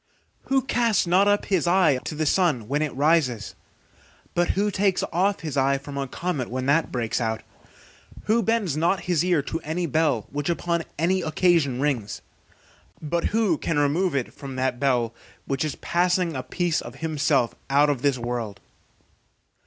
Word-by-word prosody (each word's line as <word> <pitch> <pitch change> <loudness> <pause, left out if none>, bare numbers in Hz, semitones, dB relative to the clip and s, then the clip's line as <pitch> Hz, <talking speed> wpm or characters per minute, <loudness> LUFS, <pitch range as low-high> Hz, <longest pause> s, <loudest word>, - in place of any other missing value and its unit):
Who 270 -1 +1
casts 235 -6 +1
not 185 +4 +4
up 205 0 +2
his 185 -4 +1
eye 170 -7 +4
to 155 - -4
the 155 +1 -1
sun 150 - +1
when 145 +3 0
it 155 -2 -1
rises? 140 -6 +1 0.8
but 175 0 +2
who 205 +1 +2
takes 195 -1 +1
off 195 +4 +1
his 155 -4 -5
eye 140 0 +2
from 140 +1 -9
a 140 -1 -2
comet 155 -3 -3
when 130 +2 -3
that 145 +4 +2
breaks 120 -1 -1
out? 110 -1 -2 0.8
Who 225 +2 +2
bends 220 -8 0
not 170 +3 +1
his 175 -3 +1
ear 175 -5 +2
to 165 - -4
any 170 +3 -3
bell 150 -7 +1
which 145 +3 -3
upon 170 -1 -1
any 180 +5 +1
occasion 155 -5 +2
rings? 135 -8 -2 0.8
but 170 +3 -2
who 210 -7 +1
can 165 - -1
remove 150 +4 +1
it 130 -3 -2
from 135 -2 -8
that 130 -1 -1
bell 125 -4 +1 0.3
which 135 +1 -1
is 155 -3 -2
passing 175 -1 0
a 130 - -2
piece 160 +6 -1
of 120 +2 -9
himself 145 -4 0 0.2
out 145 +2 +4
of 135 -4 -3
this 140 -2 +2
world? 120 -4 -4
155 Hz, 175 wpm, -24 LUFS, 135-175 Hz, 0.8 s, not